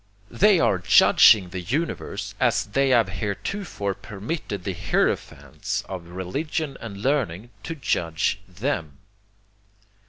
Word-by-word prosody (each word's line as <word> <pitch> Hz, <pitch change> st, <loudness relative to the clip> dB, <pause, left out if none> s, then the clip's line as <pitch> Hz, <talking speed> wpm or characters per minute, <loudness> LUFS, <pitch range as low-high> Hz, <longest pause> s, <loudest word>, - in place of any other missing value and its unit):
They 205 Hz, -2 st, +4 dB
are 95 Hz, -, +2 dB
judging 90 Hz, +1 st, +6 dB
the 90 Hz, 0 st, -5 dB
universe 140 Hz, -, -3 dB
as -, -, +2 dB
they 135 Hz, +6 st, +1 dB
have 120 Hz, -5 st, +4 dB
heretofore 100 Hz, -, -3 dB
permitted 105 Hz, -, -6 dB
the 95 Hz, -, -3 dB
hierophants -, -, -2 dB
of 90 Hz, -3 st, -7 dB
religion 135 Hz, -, -3 dB
and 105 Hz, -4 st, -7 dB
learning 120 Hz, -, -1 dB
to 165 Hz, -, -5 dB
judge 90 Hz, -, -1 dB
THEM. 90 Hz, -, -3 dB
105 Hz, 115 wpm, -24 LUFS, 90-140 Hz, -, judging